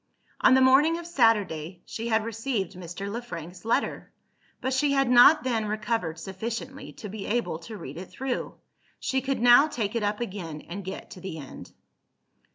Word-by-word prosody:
On 260 - +6
the 260 - +5
morning 295 +6 +5
of 340 - -7
Saturday, 200 - +1
she 230 +1 -5
had 220 -1 +1
received 225 -4 -2
Mr. 180 +2 -7
Le 225 +4 -4
Frank's 175 -6 -8
letter; 225 - -1 0.5
but 260 +1 -1
she 280 +2 +2
had 275 -1 +3
not 250 +6 +7
then 230 -4 0
recovered 210 -6 -2
sufficiently 225 +9 -6
to 215 - -8
be 200 0 -6
able 230 -7 -1
to 215 +6 -9
read 140 -5 -8
it 180 +1 -8
through. 265 -1 -4 0.4
She 265 0 0
could 270 +1 -1
now 245 +5 +8
take 225 -8 -3
it 230 - -1
up 210 0 -1
again, 185 -9 -5
and 195 +4 -7
get 190 - -7
to 180 - -10
the 190 -4 -6
end. 140 -4 -10
220 Hz, 180 wpm, -27 LUFS, 185-255 Hz, 0.5 s, now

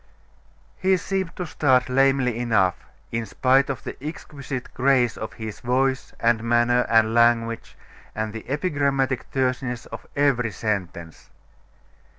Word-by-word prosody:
He 190 0 +3
seemed 190 -2 -3
to 180 - -4
start 130 -5 +2
lamely 135 -2 +2
enough, 105 -7 +1 0.3
in 115 -1 -2
spite 135 +5 +2
of 135 - -4
the - - -8
exquisite 140 -4 -6
grace 130 -3 +2
of 110 0 -6
his 110 -2 -7
voice, 130 +2 0
and 115 -1 +2
manner, 120 +1 +2
and 110 -1 +4
language, 115 -1 +2 0.4
and 110 -1 -3
the 110 +1 -8
epigrammatic 140 -4 0
terseness 130 -2 -1
of - - -9
every 135 -5 +2
sentence. 90 -5 -4
125 Hz, 130 wpm, -24 LUFS, 115-135 Hz, 0.4 s, and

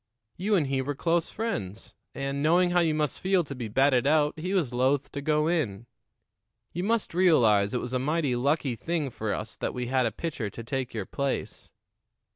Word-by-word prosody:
You 205 +4 +1
and 165 -6 +2
he 135 -1 0
were 145 +2 -3
close 165 +3 0
friends, 175 - -4 0.2
and, 140 +1 -3
knowing 175 +4 +3
how 175 - +3
you 160 -3 +2
must 150 -3 -1
feel 190 -1 +2
to 140 - -7
be 125 -4 -5
batted 130 +3 +3
out, 150 0 +3
he 185 +5 -2
was 150 -10 0
loath 130 +3 +1
to 140 - -5
go 150 +1 +1
in. 120 - -1 0.9
You 175 - -3
must 225 -1 0
realize 115 - +4
it 125 - 0
was 125 - -5
a 130 - +1
mighty 145 -1 0
lucky 140 0 0
thing 155 0 -2
for 110 -2 -3
us 110 - -4
that - - -3
we 125 0 -2
had 130 -2 +2
a - - -2
pitcher 140 -9 -4
to 115 - -9
take 125 0 -3
your 105 -4 -3
place. 140 +5 -3
140 Hz, 205 wpm, -27 LUFS, 125-165 Hz, 0.9 s, realize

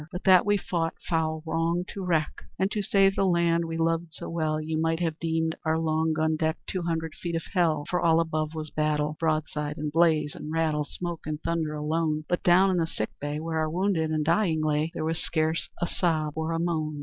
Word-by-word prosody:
"But 180 - -6
that 185 0 +6
we 205 0 +4
fought 165 -4 -2
foul 160 -1 0
wrong 165 +2 0
to 195 - -6
wreck, 160 -4 0
And 190 +2 +1
to 210 - -1
save 195 -1 +3
the - - +1
land 170 -2 +2
we 165 0 -4
loved 165 0 0
so - - -6
well, 155 -2 0
You 155 0 -2
might 165 0 +1
have 165 -2 -2
deemed 160 -1 0
our 160 -1 +1
long 160 0 +1
gun 155 0 +1
deck 160 0 0
Two 185 - -3
hundred 165 -2 -2
feet 170 0 -4
of 165 - -2
hell! 160 -5 +2
For 180 - 0
all 165 -1 +4
above 155 -1 -1
was 155 -1 -5
battle, 150 0 0
Broadside, 155 -2 -1
and 150 0 -3
blaze, 155 -2 +3
and 150 - -7
rattle, 155 -2 +1
Smoke 175 +1 -5
and 155 -1 -3
thunder 165 -2 -1
alone; 155 0 -1
But 175 - 0
down 185 +2 +5
in 185 - +1
the 165 -1 +1
sick 110 - -3
bay, 145 +1 -3
Where 160 0 -2
our 155 0 0
wounded 175 -2 0
and 155 -1 0
dying 165 -2 +2
lay, 155 +1 +1
There 155 - -3
was 160 0 -1
scarce 160 0 0
a - - +1
sob 160 -4 0
or 160 +1 -2
a 165 - 0
moan. 155 -3 -1
160 Hz, 225 wpm, -27 LUFS, 155-170 Hz, -, that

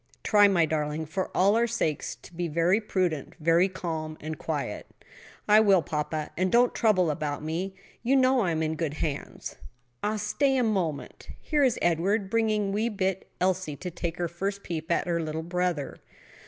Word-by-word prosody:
Try, 205 -1 +6
my 175 -4 +3
darling, 155 0 -2
for 185 +5 -3
all 200 +3 +5
our 235 +1 +3
sakes, 165 -11 -2
to - - -14
be 175 +1 -2
very 170 +6 +2
prudent, 180 -8 -1
very 165 +4 +4
calm 160 -4 -4
and 155 +1 -5
quiet." - - -4 0.6
"I 210 0 +7
will, 195 -5 +5
papa; 150 +1 -3
and 185 +1 0
don't 245 +1 +4
trouble 185 -7 +3
about 150 -1 -3
me. 175 +5 -3 0.3
You 255 +3 +2
know 260 -1 +4
I 195 -7 +1
am 160 -1 0
in 155 0 0
good 155 -2 -2
hands. 150 -2 -4 0.4
Ah, 210 +1 0
stay 265 +6 +1
a 250 - +2
moment! 180 -10 -2
here 300 -2 +1
is 250 -4 +3
Edward 190 +4 +1
bringing 215 -3 +1
wee 215 +4 0
bit 190 -3 -2
Elsie 185 -4 0
to 180 +5 -6
take 170 0 -4
her 175 - -1
first 195 +4 -4
peep 165 -1 -4
at - - +2
her 170 -1 0
little 160 0 -3
brother." 175 -4 -2
180 Hz, 180 wpm, -27 LUFS, 160-210 Hz, 0.6 s, I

